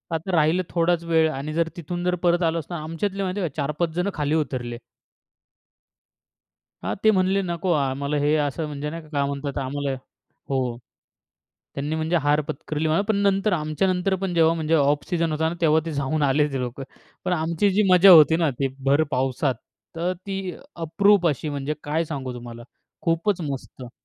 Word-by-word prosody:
आता 170 +4 -3
राहिलं 160 +3 +3
थोडाच 170 0 +1
वेळ 160 -1 +3
आणि 145 +2 -5
जर 165 0 +1
तिथून 175 +2 -4
जर 180 0 +2
परत 175 +1 +3
आलो 165 0 +1
असतो 165 +3 -8
ना, 155 - -4
आमच्यातले 190 +5 -3
माहिती 190 +2 -2
आहे 175 - -1
का 140 - -25
4-5 150 +4 -1
जण 180 +3 0
खाली 150 0 0
उतरले. 125 -6 -2 2.1
हां, - - -1
ते 220 - +6
म्हणाले 190 0 +2
नको 175 0 -2
आम्हाला 140 0 -1
हे 150 - +3
असं 155 +3 -3
म्हणजे 150 0 -4
नाही 165 +2 -6
का 155 - -17
काय 140 -2 0
म्हणतात 140 0 -4
आम्हाला 140 +1 -2 0.6
हो. 130 -3 -1 1.0
त्यांनी 145 +3 -3
म्हणजे 160 +2 0
हार 145 +1 +3
पत्करली 155 +3 -3
म्हणा. 160 +5 +2
पण 220 - +2
नंतर 200 +1 +2
आमच्यानंतर 180 +4 0
पण 185 -2 -1
जेव्हा 165 0 +4
म्हणजे 160 0 0
ऑफ 145 -1 +2
सिजन 165 -2 0
होता 160 +1 0
ना 170 - -3
तेव्हा 160 -1 +4
ते 165 - -3
जाऊन 145 +2 -1
आले 145 +1 +3
ते 135 - -2
लोक. 125 +1 -5 0.4
पण 180 - 0
आमची 170 +4 +1
जी 205 +3 +3
मजा 185 +2 +8
होती 160 -2 +8
ना 165 -3 +2
ती 135 - +1 0.2
भर 140 +3 +4
पावसात 130 0 0 0.4
तर 175 +2 0
ती 195 -2 -3 0.2
अप्रूप 175 +3 +3
अशी 150 +1 -2
म्हणजे 145 +1 -3
काय 160 +3 0
सांगू 135 -5 -5
तुम्हाला. 120 -1 -9 0.4
खूपच 170 +3 +1
मस्त. 130 -2 -8
160 Hz, 185 wpm, -24 LUFS, 145-175 Hz, 2.1 s, मजा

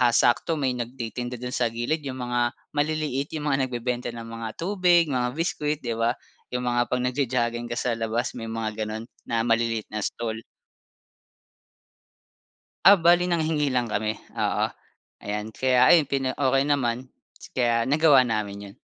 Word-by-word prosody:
sakto 120 +7 +3
may 135 -4 0
nagtitinda 120 0 -4
dun 125 +1 -6
sa 125 -2 +1
gilid 120 +8 -2
yung 130 -1 -5
mga 120 -1 0 0.2
maliliit 150 -1 -1
yung 150 -1 -1
mga 135 -1 +1
nagbebenta 125 0 -3
ng 115 0 -7
mga 115 0 -5
tubig 175 -3 +3
mga 125 0 -1
biskwit, 155 -3 -1
'di 120 - -2
ba. 115 +2 +2 0.4
Yung 125 - -1
mga 120 0 +2
'pag 125 - -1
nagjo-jogging 125 -2 0
ka 120 - -4
sa 120 -1 -1
labas 115 +2 -2
may 115 - -5
mga 110 -1 -3
ganon 110 +2 -6 0.2
na 115 -1 0
maliliit 115 -1 0
na 110 - -5
stall. 115 -1 -4 2.4
Ah, 200 - +11
bale 175 -1 +4
nanghingi 155 -5 0
lang 120 -2 0
kami, 110 +1 -1 0.2
oo - - +1 0.6
ayan. 105 +1 -4
Kaya 130 +3 +1
ayon 160 -5 +6
pina 135 -2 0
okey 135 -1 +3
naman 125 -2 0 0.4
kaya 120 -2 +2
nagawa 150 -3 +6
namin 105 -4 -2
yun. 100 - -18
125 Hz, 155 wpm, -25 LUFS, 115-145 Hz, 2.4 s, Ah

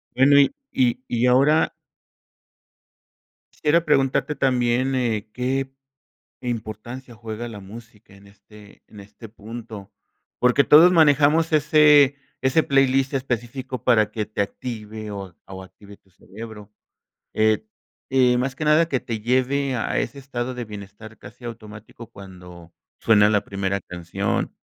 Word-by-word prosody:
Bueno, 140 +2 +5
y 140 - +3 0.2
y 125 -1 +2
y 120 +1 0
ahora 140 +5 +3 1.8
quisiera 165 +3 +1
preguntarte 145 0 +1
también, 130 0 +1
eh, 110 -4 -2
¿qué 130 +2 -2 0.7
importancia 120 +1 -6
juega 115 +1 -7
la 105 -3 -9
música 110 0 -14
en 100 - -19
este 105 +1 -18
en 105 - -15
este 105 +3 -13
punto? 110 -1 -10 0.5
Porque 125 +3 +3
todos 155 +7 +7
manejamos 160 -1 +3
ese 150 -2 +5 0.3
ese 135 +5 +2
playlist 135 0 +2
específico 130 -1 -4
para 110 -4 +3
que 110 -2 -4
te 105 -1 -2
active 110 -1 -7
o 95 -4 -8
o 95 -1 -9
active 100 +2 -16
tu 95 - -33
cerebro, 105 +2 -12 0.6
eh 110 - +1 0.4
eh, 125 -2 +3
más 130 +1 -2
que 155 - -5
nada 155 +2 +4
que 130 -5 -1
te 115 -2 -5
lleve 130 +3 0
a 120 - -2
ese 135 +4 -4
estado 130 -2 -5
de 125 -1 -5
bienestar 105 +1 -11
casi 105 +4 -15
automático 110 0 -10
cuando 90 -5 -13 0.3
suena 105 -2 +4
la 105 -1 +1
primera 100 0 -3
canción, 90 +3 -4
120 Hz, 135 wpm, -22 LUFS, 105-135 Hz, 1.8 s, todos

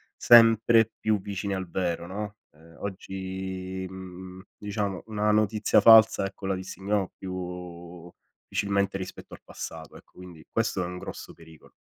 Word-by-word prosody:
sempre 115 -1 +6
più 110 -2 +1
vicine 100 0 -4
al 95 -1 -4
vero, 85 -1 -2
no, 105 +3 -6 0.2
ehm, 80 +2 -19
oggi, 95 -1 -5
mhmm, 95 0 -10
diciamo, 105 -2 -3
una 105 -1 0
notizia 110 0 +3
falsa 110 -3 +7
ecco 95 0 -10
la 95 - 0
distinguiamo 95 +1 -3
più 90 -2 -7 0.4
difficilmente 100 -1 0
rispetto 95 - -9
al - - -11
passato, 80 -1 -9
ecco - - -19
quindi, 90 -3 -12
questo 115 -5 0
è - - -2
un 90 +1 -6
grosso - - -8
pericolo. 80 -1 -17
95 Hz, 140 wpm, -27 LUFS, 90-105 Hz, 0.4 s, falsa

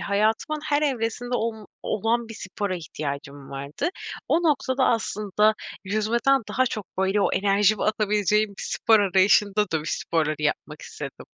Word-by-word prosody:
hayatımın 220 +9 0
her 295 -1 +1
evresinde 245 -3 -1
olm 220 -2 -3 0.2
olan 230 +2 0
bir 225 - -8
spora 190 0 -4
ihtiyacım 140 -3 -6
vardı. 140 - -3 0.4
O 335 - +3
noktada 275 -4 +2
aslında 215 -2 +1 0.3
yüzmeden 230 +6 +2
daha 255 +1 +1
çok, 215 -5 -4
böyle, 190 +2 +2
o - - +2
enerjimi 205 +1 +3
atabileceğim 210 0 +2
bir - - -5
spor 220 -2 +3
arayışında 200 +2 +3
dövüş 160 -1 -1
sporları 155 -2 -1
yapmak 150 - -2
istedim. - - -8
210 Hz, 135 wpm, -25 LUFS, 190-230 Hz, 0.4 s, O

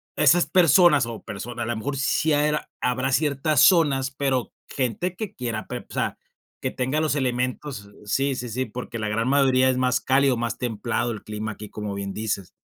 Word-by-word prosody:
esas 155 +3 +4
personas, 170 -4 +5
o, 115 -1 -7
personas 120 +4 -6
a - - -4
lo 120 - -1
mejor 140 +5 -3
sí 150 +3 +1 0.5
habrá 130 +2 0
ciertas 145 0 +1
zonas, 145 -7 +4
pero 135 -3 -1 0.2
gente 135 - -2
que 215 +1 -6
quiera 115 -3 -4
prep - - -6
o - - -9
sea, - - -1 0.4
que - - -2
tenga 130 +4 -1
los 155 -2 +1
elementos, 125 -4 -2
sí, 135 +6 +1
sí, 125 -1 -5
sí, 130 +4 -2
porque 120 +1 -7
la 110 -1 -2
gran 115 +3 0
mayoría 130 -2 +4
es 130 - +1
más 130 0 +1
cálido, 135 -1 +3
más 115 0 -2
templado 120 +1 -2
el 110 - -7
clima 105 0 -4
aquí, 105 0 -9
como 105 -1 -5
bien 100 0 -4
dices. 105 -4 -3
125 Hz, 190 wpm, -24 LUFS, 115-140 Hz, 0.5 s, personas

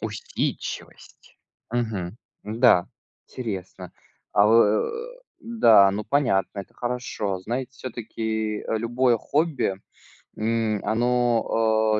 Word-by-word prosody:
Усидчивость, - - -5 0.3
мгм, 110 -6 -2 0.3
да, 110 -4 +4 0.4
интересно. 95 -6 -6 0.4
А 100 0 +5
э - - +3
э, 460 - +2 0.2
да, 115 - +5
ну, 105 +2 -3
понятно, 105 -6 +1
это 95 - -12
хорошо. 120 -5 -3
Знаете, 125 +6 -4
всё-таки 110 -3 -4
любое 120 +2 +2
хобби, 150 - 0 0.6
м, 110 -1 0
оно, 115 -2 +2
110 Hz, 90 wpm, -24 LUFS, 105-125 Hz, 0.6 s, А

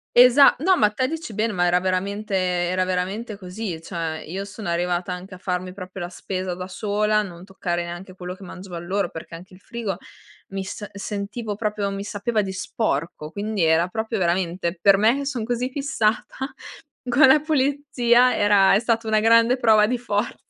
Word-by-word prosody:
Esa 250 +3 +8
no, 365 +3 +3
ma 210 0 +4
te 255 +4 0
dici 320 -8 -5
bene, 220 +1 0
ma 180 -1 +1
era 175 +1 +3
veramente 195 +3 -2
era 180 0 +1
veramente 195 +5 -2
così. 185 -3 -6
Cioè, 165 -2 -4
io 195 +4 -4
sono 205 -2 -7
arrivata 175 +1 -1
anche 185 +1 -7
a 180 - -10
farmi 180 0 -3
proprio 185 -1 -8
la 175 - -4
spesa 185 0 -4
da 180 +1 -6
sola, 210 +2 0
non 175 -2 -10
toccare 175 -3 -3
neanche 175 +2 -8
quello 180 0 -7
che 195 - -14
mangiavan 180 -2 -8
loro 195 0 -1
perché 160 +1 -9
anche 180 +2 -11
il - - -17
frigo 210 -4 -4 0.5
mi 195 0 -4
s 205 +2 -6
sentivo 205 +2 -4
proprio 210 -1 -2
mi 195 0 -4
sapeva 210 +1 -1
di 190 - -4
sporco, 165 -6 -3
quindi 205 -2 -2
era 160 +2 +3
proprio 220 +2 -3
veramente 175 0 0
per 195 +1 +5
me 220 +5 +4
che 280 - -3
son 255 -5 -2
così 245 +2 -2
fissata 265 -1 -1 0.5
con 245 +4 +6
la 265 +3 +7
pulizia 275 -4 +2
era 205 -2 +5
è 200 - +5
stata 230 -1 0
una 215 -1 +3
grande 230 +2 +5
prova 220 -4 +4
di 250 +1 0
forza. 215 -2 -2
200 Hz, 185 wpm, -23 LUFS, 180-225 Hz, 0.5 s, Esa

